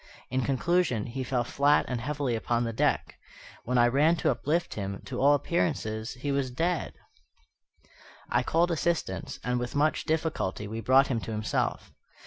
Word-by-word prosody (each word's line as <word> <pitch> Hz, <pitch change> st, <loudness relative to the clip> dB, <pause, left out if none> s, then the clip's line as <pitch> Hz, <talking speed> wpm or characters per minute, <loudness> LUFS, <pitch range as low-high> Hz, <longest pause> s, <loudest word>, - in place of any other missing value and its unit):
In 130 Hz, +1 st, +1 dB
conclusion, 135 Hz, -2 st, +1 dB
he 130 Hz, +2 st, -4 dB
fell 125 Hz, -1 st, 0 dB
flat 145 Hz, +4 st, +3 dB
and 125 Hz, -2 st, -3 dB
heavily 140 Hz, -1 st, -2 dB
upon 120 Hz, +1 st, 0 dB
the 115 Hz, -1 st, -2 dB
deck. -, -, 0 dB, 0.5 s
When 125 Hz, +1 st, 0 dB
I 120 Hz, 0 st, +6 dB
ran 145 Hz, +7 st, +3 dB
to 155 Hz, -, +1 dB
uplift 165 Hz, +4 st, -1 dB
him, 100 Hz, -2 st, -4 dB
to 125 Hz, -1 st, -4 dB
all 145 Hz, +2 st, +6 dB
appearance 165 Hz, +2 st, 0 dB, 0.3 s
he 140 Hz, +3 st, -3 dB
was 140 Hz, -2 st, 0 dB
dead. 165 Hz, +6 st, -1 dB, 1.3 s
I -, -, +2 dB
called 170 Hz, +2 st, +1 dB
assistance, 165 Hz, -, -1 dB
and, 125 Hz, 0 st, 0 dB
with 120 Hz, +2 st, -4 dB
much 150 Hz, +2 st, +1 dB
difficulty, 155 Hz, -, -1 dB
we 110 Hz, +2 st, -5 dB
brought 130 Hz, +4 st, +5 dB
him 120 Hz, -4 st, 0 dB
to 115 Hz, -, -6 dB
himself. 105 Hz, -1 st, -2 dB
130 Hz, 165 wpm, -28 LUFS, 120-155 Hz, 1.3 s, I